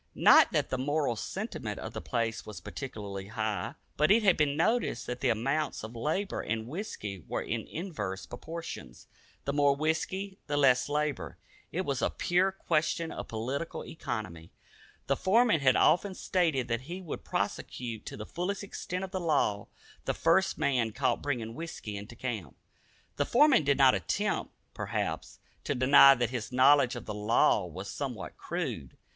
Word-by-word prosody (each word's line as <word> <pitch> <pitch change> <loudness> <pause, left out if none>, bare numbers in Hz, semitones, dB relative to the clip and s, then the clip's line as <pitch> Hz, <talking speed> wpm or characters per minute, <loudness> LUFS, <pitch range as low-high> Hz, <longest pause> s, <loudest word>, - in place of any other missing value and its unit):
Not - - +7
that - - 0
the 130 - -1
moral 145 -2 0
sentiment - - -4
of - - -6
the - - -5
place 115 -2 -2
was 105 - -8
particularly 100 -7 -6
high, 110 -1 -3 0.2
but 150 +1 +3
it 220 +2 +5
had 195 -4 +5
been 145 -1 +1
noticed 220 - +1
that 125 0 -4
the 130 - +2
amounts 135 +7 0
of 110 +2 -7
labor 160 - -1
and 110 0 -3
whisky 115 - -5
were - - -2
in - - -3
inverse 130 - -4
proportion. 160 - -7 0.5
The 140 - -1
more 145 -1 +4
whisky, 185 +6 -2
the 145 0 -1
less 135 -2 +4
labor. 150 -2 -2 0.3
It 180 - -1
was 140 -7 -2
a - - +2
pure 185 +2 +1
question 165 -2 0
of - - -6
political 130 +8 -4
economy. 85 - -5 0.6
The 140 - +1
foreman 215 - +3
had 130 -2 +4
often 190 +2 +3
stated 160 -12 +1
that 115 0 -1
he 180 +2 -4
would 180 -5 -6
prosecute 115 -3 -3
to - - -6
the 105 - -6
fullest 190 - -3
extent 185 -2 -5
of 190 - -5
the 190 - -2
law 145 - +1 0.4
the - - 0
first 170 +4 +3
man 130 -7 +1
caught - - 0
bringing 120 -6 -2
whisky 155 -8 -6
into 105 +4 -8
camp. 110 - -5 0.6
The 145 - +2
foreman 270 - +5
did 140 -1 +2
not 135 -2 +7
attempt, 95 -5 -1 0.2
perhaps, - - -3 0.3
to 145 - -1
deny 135 +2 +8
that 120 -1 -1
his 120 -2 -4
knowledge 130 0 +5
of 120 - -7
the 105 - -4
law 105 +2 +3
was - - -7
somewhat - - -5
crude. 65 -3 -4
140 Hz, 170 wpm, -30 LUFS, 115-165 Hz, 0.6 s, deny